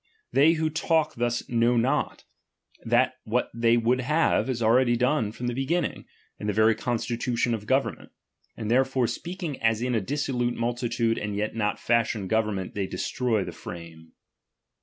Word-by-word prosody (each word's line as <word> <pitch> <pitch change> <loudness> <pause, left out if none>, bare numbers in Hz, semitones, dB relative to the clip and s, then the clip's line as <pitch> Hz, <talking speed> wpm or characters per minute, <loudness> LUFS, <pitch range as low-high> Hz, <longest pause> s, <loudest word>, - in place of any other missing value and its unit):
They 150 +4 +5
who 160 -1 -1
talk 160 -1 +1
thus 120 0 -1
know 120 0 +2
not, 120 +3 0 0.6
that - - +2
what - - -1
they 115 0 +3
would 120 +2 +2
have, 150 +1 +2
is 125 -3 -1
already 120 +2 +4
done 125 -3 +1
from 120 +3 -7
the 120 - -1
beginning, 145 +6 -2 0.3
in 105 - -4
the 105 - +1
very 110 +2 +4
constitution 120 +1 -1
of 105 -2 -4
govern 135 +3 +1
ment; - - -16 0.5
and 110 -1 -3
therefore 130 0 +2
speaking 170 +2 -5
as 115 -1 +2
in 125 0 0
a 110 - +1
dissolute 125 0 -1
multitude 120 -1 -1
and 105 0 -3
yet 105 +1 -2
not 105 -2 -1
fashioned 115 -4 0
government, 105 -4 0
they 100 -2 -2
destroy 115 -3 -1
the - - -6
frame. 80 -2 -10
120 Hz, 165 wpm, -26 LUFS, 110-130 Hz, 0.6 s, They